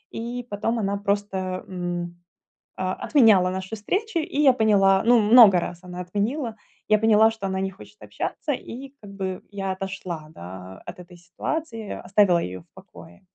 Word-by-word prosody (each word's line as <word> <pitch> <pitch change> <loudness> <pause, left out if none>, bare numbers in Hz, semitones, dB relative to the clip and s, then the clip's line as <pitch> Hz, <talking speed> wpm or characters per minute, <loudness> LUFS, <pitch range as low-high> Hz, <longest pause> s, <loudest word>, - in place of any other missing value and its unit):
И 240 +2 -5
потом 215 +3 -1
она 200 -1 -1
просто, 200 -1 -1 0.3
м, 175 -1 -4 0.6
о 185 0 -1
отменяла 215 - +5
наши 190 +3 -5
встречи, 375 - -2
и 315 0 -6
я 270 - +7
поняла, 200 -5 +4
ну, 240 0 +6
много 220 +1 +8
раз 175 0 -6
она 180 0 -7
отменила, 215 - -2 0.3
я 215 0 +5
поняла, 220 0 +5
что 220 -3 -6
она 190 0 -2
не 190 0 -1
хочет 105 - -16
общаться, 105 - -4
и 265 +1 -7
как 205 - -11
бы 190 -2 -4
я 195 -2 -3
отошла, 185 -4 -6
да, 95 +1 -10
от - - -8
этой 180 0 -13
ситуации, 225 - -5
оставила 190 -2 +4
ее 90 +1 -5
в - - -21
покое. 85 - -15
200 Hz, 165 wpm, -24 LUFS, 180-225 Hz, 0.6 s, много